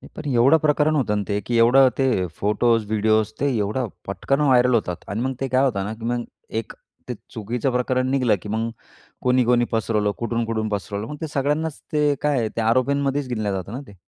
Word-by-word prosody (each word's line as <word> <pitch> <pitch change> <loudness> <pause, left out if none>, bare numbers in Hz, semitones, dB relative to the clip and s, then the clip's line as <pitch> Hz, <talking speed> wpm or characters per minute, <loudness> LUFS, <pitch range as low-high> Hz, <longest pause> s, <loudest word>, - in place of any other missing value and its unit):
पण 155 - -8
एवढं 130 +7 +5
प्रकरण 155 0 +2
होतं 105 -7 +1
ना, 105 - -1
ते 100 -1 0
की 120 -1 0
एवढं 130 +3 +6
ते 130 -9 +1
फोटोज, 110 +2 +2
व्हिडिओज 110 0 +2
ते 140 +1 +1
एवढं 110 +4 -1 0.2
पटकन 135 +8 -1
व्हायरल 125 -3 +4
होतात 90 -6 -2
आणि 105 +3 -3
मग 130 +1 -1
ते 135 - 0
काय 130 +1 +2
होतं 100 -7 0
ना, 105 - -4
की 110 +1 -9
मग 120 0 -1 0.4
एक - - -13 0.4
ते - - -1 0.2
चुकीचं 120 +4 -2
प्रकरण 130 +1 0
निघलं, 125 -6 +2
की 105 - -8
मग 110 +2 -1 0.5
कोणी-कोणी 125 -1 +3
पसरवलं? 105 -2 0
कुठून-कुठून 115 -2 -2
पसरवलं? 100 +2 -4
मग - - -5
ते 160 - -2
सगळ्यांनाच 150 +3 -1
ते 150 -1 +3
काय 135 -7 +1
ते 115 - 0
आरोपींमध्येच 135 +4 +1
गिनल्या 110 -4 -1
जात 95 0 -4
ना 125 - -5
ते. 100 - -13
120 Hz, 195 wpm, -22 LUFS, 110-135 Hz, 0.5 s, एवढं